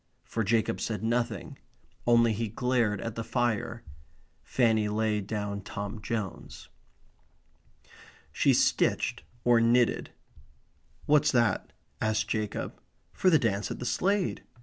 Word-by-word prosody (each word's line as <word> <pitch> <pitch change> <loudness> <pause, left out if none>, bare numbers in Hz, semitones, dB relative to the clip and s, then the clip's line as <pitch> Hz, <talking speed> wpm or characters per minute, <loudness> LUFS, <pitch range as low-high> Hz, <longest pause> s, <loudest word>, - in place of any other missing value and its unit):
For 115 - -2
Jacob 110 +2 +1
said 110 -1 -3
nothing. 115 -3 -2 0.5
Only 115 -1 +5
he 115 +2 -2
glared 115 -2 0
at 115 - -4
the 115 - -4
fire. 115 0 -1 0.6
Fanny 110 -4 +2
laid 105 -1 0
down 105 -2 -3
Tom 100 +1 -6
Jones. 110 -4 -5 1.6
She - - +3
stitched - - +2 0.2
or 120 -1 +5
knitted. 120 +1 +3 1.0
"What's 150 0 +4
that?" 120 -3 +1 0.3
asked 110 0 +1
Jacob. 110 -2 -3 0.3
"For 185 - +3
the 160 - +6
dance 105 -6 0
at - - -4
the 125 - -6
Slade." 195 +7 0
115 Hz, 120 wpm, -29 LUFS, 105-120 Hz, 1.6 s, the